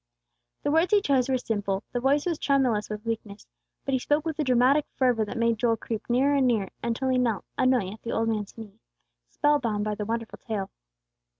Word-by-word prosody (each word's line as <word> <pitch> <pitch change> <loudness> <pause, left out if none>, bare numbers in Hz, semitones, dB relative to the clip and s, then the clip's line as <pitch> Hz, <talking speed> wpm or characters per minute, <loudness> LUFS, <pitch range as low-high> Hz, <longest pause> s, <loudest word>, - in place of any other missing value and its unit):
The - - +1
words 325 +4 +3
he 420 - +5
chose 270 -8 +1
were 260 - +2
simple, 205 -5 -2
the 245 - -1
voice 275 +3 +2
was 340 -4 -1
tremulous 255 -7 +1
with 210 +1 -6
weakness; 215 -2 -5 0.4
but 275 - -1
he 260 - +2
spoke 295 +4 0
with 320 -1 -3
a - - +2
dramatic 260 +3 +3
fervor 250 -4 +2
that 225 - -6
made 230 -1 +1
Joel 230 -1 +2
creep 225 0 -5
nearer 265 +4 +3
and 275 -2 +3
nearer, 215 -6 +1
until 235 +3 -1
he 255 -1 +2
knelt, 230 -6 0
unknowing, 250 -7 +2
at 220 - -14
the 230 - -5
old 225 0 0
man's 215 -2 -3
knee, 215 -1 -11 0.5
spell 295 0 +2
bound 215 -5 -1
by 215 0 -1
the 210 0 -4
wonderful 230 +1 -4
tale. 205 -4 -4
240 Hz, 215 wpm, -26 LUFS, 220-270 Hz, 0.5 s, he